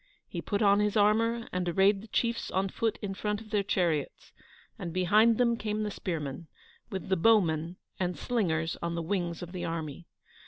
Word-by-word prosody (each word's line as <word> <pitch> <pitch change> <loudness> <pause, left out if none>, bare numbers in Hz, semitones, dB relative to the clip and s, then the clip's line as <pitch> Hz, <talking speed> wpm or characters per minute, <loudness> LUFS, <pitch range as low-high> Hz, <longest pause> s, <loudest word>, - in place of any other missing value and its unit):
He - - -5
put 205 +1 -1
on 200 0 +5
his 210 0 +1
armour, 230 +3 +3
and 180 -1 -1
arrayed 195 +3 +3
the 220 - -12
chiefs 235 +1 -1
on 190 +1 0
foot 225 +3 -1
in 195 -1 -2
front 210 +1 -2
of 220 -1 -13
their 210 - +2
chariots, 175 -7 -1 0.5
and 170 - -4
behind 210 +6 +4
them 235 -1 +3
came 215 -1 -2
the 210 - -2
spearmen, 160 -4 -4 0.4
with 190 -5 -5
the 190 - +3
bowmen 170 -5 +3 0.2
and 180 -1 -1
slingers 165 -10 0
on 170 0 -2
the 170 - -2
wings 175 -2 -2
of 175 - -8
the 180 -2 -5
army. 165 -1 -4
195 Hz, 190 wpm, -29 LUFS, 170-215 Hz, 0.5 s, on